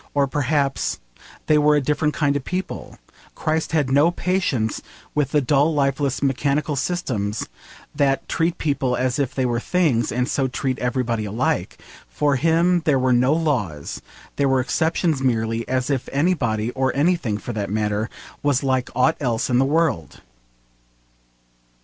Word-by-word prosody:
Or 140 Hz, -1 st, +4 dB
perhaps 140 Hz, 0 st, 0 dB, 0.5 s
they 150 Hz, -1 st, +4 dB
were 150 Hz, 0 st, +4 dB
a -, -, +4 dB
different 150 Hz, +2 st, 0 dB
kind 145 Hz, -1 st, +1 dB
of 140 Hz, -, -2 dB
people. 185 Hz, +5 st, -5 dB, 0.4 s
Christ 160 Hz, 0 st, -1 dB
had 145 Hz, -5 st, +1 dB
no 145 Hz, +5 st, +5 dB
patience 175 Hz, -, -1 dB, 0.3 s
with 145 Hz, -3 st, +1 dB
the 150 Hz, 0 st, +2 dB
dull 145 Hz, +4 st, +2 dB
lifeless 140 Hz, -1 st, 0 dB
mechanical 140 Hz, +2 st, 0 dB
systems 125 Hz, -, -2 dB, 0.5 s
that 135 Hz, -1 st, +1 dB
treat 165 Hz, +1 st, 0 dB
people 135 Hz, -4 st, 0 dB
as 130 Hz, +2 st, -1 dB
if 130 Hz, -2 st, -1 dB
they 130 Hz, -, +1 dB
were 120 Hz, -1 st, 0 dB
things, 140 Hz, -7 st, +1 dB
and 125 Hz, +2 st, 0 dB
so 135 Hz, -2 st, 0 dB
treat 130 Hz, +1 st, -2 dB
everybody 120 Hz, -3 st, -1 dB
alike: 110 Hz, +5 st, -1 dB, 0.3 s
for 145 Hz, -2 st, +1 dB
him 170 Hz, +4 st, +3 dB
there 145 Hz, -3 st, +3 dB
were 130 Hz, -1 st, +2 dB
no 125 Hz, +4 st, +3 dB
laws: 120 Hz, -, -2 dB, 0.4 s
there 140 Hz, -1 st, +2 dB
were 135 Hz, 0 st, +3 dB
exceptions 160 Hz, +2 st, 0 dB
merely, 115 Hz, -2 st, 0 dB
as 130 Hz, +1 st, -1 dB
if 135 Hz, -3 st, -2 dB
anybody, 125 Hz, -8 st, 0 dB
or 130 Hz, 0 st, 0 dB
anything, 145 Hz, -8 st, +1 dB
for 120 Hz, -, -6 dB
that 105 Hz, -2 st, -3 dB
matter, 105 Hz, +1 st, -1 dB, 0.3 s
was 145 Hz, -2 st, +1 dB
like 130 Hz, -2 st, 0 dB
aught 140 Hz, +6 st, +3 dB
else 120 Hz, -2 st, -1 dB
in 125 Hz, -, +3 dB
the 135 Hz, -, +4 dB
world! 145 Hz, -, 0 dB
135 Hz, 155 wpm, -22 LUFS, 125-150 Hz, 0.5 s, no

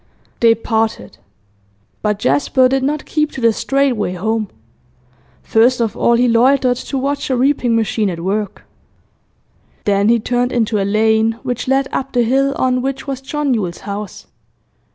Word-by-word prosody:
They 230 Hz, -1 st, +5 dB
parted. 220 Hz, -, -2 dB, 0.8 s
But 210 Hz, -1 st, 0 dB
Jasper 170 Hz, -, +2 dB
did 270 Hz, +1 st, 0 dB
not 295 Hz, +3 st, -2 dB
keep 305 Hz, -1 st, -1 dB
to 265 Hz, -, -6 dB
the 230 Hz, -1 st, +4 dB
straight 275 Hz, +5 st, +1 dB
way 210 Hz, -6 st, -2 dB
home. 215 Hz, +3 st, -2 dB, 0.9 s
First 240 Hz, +3 st, +3 dB
of 225 Hz, -3 st, -1 dB
all, 235 Hz, -, +2 dB
he 245 Hz, +1 st, +3 dB
loitered 250 Hz, +2 st, +3 dB
to 275 Hz, -, -5 dB
watch 280 Hz, +2 st, -2 dB
a 260 Hz, -, +1 dB
reaping 255 Hz, -2 st, +1 dB
machine 220 Hz, -2 st, 0 dB
at 170 Hz, -2 st, -5 dB
work; 200 Hz, +2 st, -3 dB, 1.2 s
then 200 Hz, +1 st, +2 dB
he 235 Hz, 0 st, +4 dB
turned 245 Hz, +2 st, -1 dB
into 225 Hz, -3 st, 0 dB
a -, -, 0 dB
lane 220 Hz, +2 st, +2 dB
which 245 Hz, -2 st, -3 dB
led 270 Hz, +1 st, +1 dB
up 270 Hz, 0 st, -3 dB
the 245 Hz, -1 st, +3 dB
hill 275 Hz, +4 st, +1 dB
on 255 Hz, -1 st, +1 dB
which 270 Hz, +1 st, -4 dB
was 270 Hz, -2 st, -5 dB
John 285 Hz, 0 st, -1 dB
Yule's 185 Hz, -7 st, -3 dB
house. 200 Hz, -1 st, -6 dB
235 Hz, 165 wpm, -17 LUFS, 215-265 Hz, 1.2 s, They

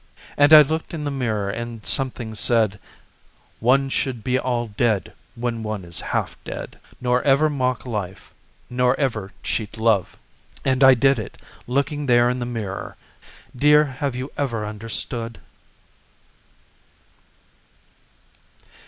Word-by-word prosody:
And 145 Hz, +1 st, +4 dB
I 155 Hz, -1 st, +11 dB
looked 160 Hz, +3 st, -3 dB
in 155 Hz, -, -4 dB
the 145 Hz, -, -2 dB
mirror 110 Hz, -7 st, -1 dB
and 115 Hz, -1 st, -6 dB
something 125 Hz, -4 st, -1 dB
said: 110 Hz, -2 st, +2 dB, 0.8 s
"One 135 Hz, +4 st, +3 dB
should 130 Hz, -4 st, -2 dB
be 130 Hz, +2 st, +1 dB
all 120 Hz, -2 st, -1 dB
dead 110 Hz, -1 st, -1 dB, 0.2 s
when 115 Hz, -1 st, -3 dB
one 105 Hz, -4 st, -4 dB
is 85 Hz, -1 st, -6 dB
half -, -, -3 dB
dead—" -, -, -7 dB, 0.2 s
Nor 125 Hz, 0 st, +1 dB
ever 145 Hz, +2 st, +3 dB
mock 130 Hz, -3 st, -1 dB
life, 100 Hz, -6 st, -5 dB, 0.3 s
nor 125 Hz, +1 st, +1 dB
ever 110 Hz, -8 st, -1 dB
cheat 110 Hz, 0 st, -3 dB
love." 110 Hz, -4 st, +1 dB, 0.5 s
And 130 Hz, 0 st, +2 dB
I 135 Hz, -1 st, +8 dB
did 135 Hz, +1 st, +3 dB
it 105 Hz, -, -8 dB, 0.3 s
looking 140 Hz, +3 st, -1 dB
there 120 Hz, 0 st, +4 dB
in 125 Hz, -, -3 dB
the 120 Hz, -, -3 dB
mirror— 110 Hz, -5 st, -5 dB, 0.6 s
Dear, 150 Hz, +3 st, +5 dB
have 135 Hz, -1 st, -3 dB
you 130 Hz, +2 st, -5 dB
ever 120 Hz, -7 st, -1 dB
understood? 115 Hz, +2 st, -5 dB
120 Hz, 130 wpm, -22 LUFS, 110-135 Hz, 0.8 s, I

